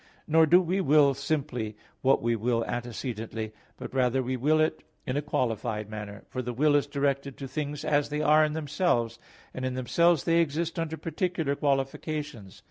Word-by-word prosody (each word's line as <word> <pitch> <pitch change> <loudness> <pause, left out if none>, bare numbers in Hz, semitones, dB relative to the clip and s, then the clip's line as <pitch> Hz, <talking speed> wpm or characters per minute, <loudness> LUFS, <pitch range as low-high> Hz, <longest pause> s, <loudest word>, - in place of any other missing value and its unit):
Nor 160 +1 +4
do 175 +4 +7
we 185 +3 0
will 145 -3 +5
simply, 135 -6 -3 0.2
what 135 -2 +3
we 120 0 +2
will 115 +1 0
antecedently, 115 -2 -4 0.2
but - - -8
rather 130 0 +2
we 130 +1 -2
will 150 +5 +2
it 155 0 +1 0.2
in 125 - -2
a 145 - +1
qualified 110 -6 -2
manner; 105 -1 -7
for 130 - -4
the 125 0 -4
will 145 +3 +3
is 145 0 +2
directed 140 -1 -1
to 135 - -6
things 145 +1 -4
as 145 -1 +2
they 150 +1 -1
are 155 +1 +6
in 150 -1 0
themselves, 145 -7 0 0.3
and 130 - -5
in 130 0 -2
themselves 165 +5 +2
they 170 0 +3
exist 165 +2 -1
under 160 -1 -3
particular 165 -4 -1
qualifications. 140 - -2
140 Hz, 180 wpm, -28 LUFS, 120-155 Hz, 0.3 s, do